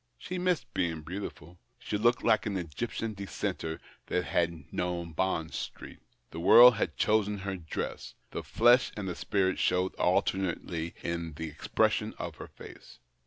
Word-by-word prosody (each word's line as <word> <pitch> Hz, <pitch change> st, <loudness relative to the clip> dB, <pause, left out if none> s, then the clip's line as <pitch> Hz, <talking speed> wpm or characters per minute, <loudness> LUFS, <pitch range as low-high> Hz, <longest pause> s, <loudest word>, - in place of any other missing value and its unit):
She 180 Hz, 0 st, -5 dB
missed 180 Hz, -2 st, 0 dB
being 80 Hz, -3 st, -1 dB
beautiful. 90 Hz, -1 st, -7 dB, 0.2 s
She -, -, -4 dB
looked 120 Hz, +4 st, +2 dB
like 110 Hz, -1 st, +3 dB
an 100 Hz, -2 st, -1 dB
Egyptian 110 Hz, +6 st, -4 dB
dissenter 95 Hz, -5 st, -4 dB, 0.3 s
that 90 Hz, -, 0 dB
had 80 Hz, -2 st, -1 dB
known 85 Hz, -1 st, -2 dB
Bond 80 Hz, -1 st, -1 dB
Street, -, -, -7 dB, 0.3 s
The 80 Hz, -, -6 dB
w^orld 120 Hz, +6 st, +9 dB
had -, -, -2 dB
chosen 105 Hz, -1 st, +2 dB
her 95 Hz, 0 st, -4 dB
dress; 80 Hz, -4 st, -5 dB, 0.2 s
the -, -, -4 dB
flesh 120 Hz, +2 st, +4 dB
and 100 Hz, -2 st, -3 dB
the 90 Hz, -, -2 dB
spirit 95 Hz, +1 st, 0 dB
showed 90 Hz, +1 st, +1 dB
alternately 85 Hz, -3 st, 0 dB
in 85 Hz, -1 st, -3 dB
the 80 Hz, +1 st, -5 dB
expression 75 Hz, -, 0 dB
of -, -, -6 dB
her -, -, -8 dB
face. -, -, -13 dB
95 Hz, 155 wpm, -30 LUFS, 85-105 Hz, 0.3 s, w^orld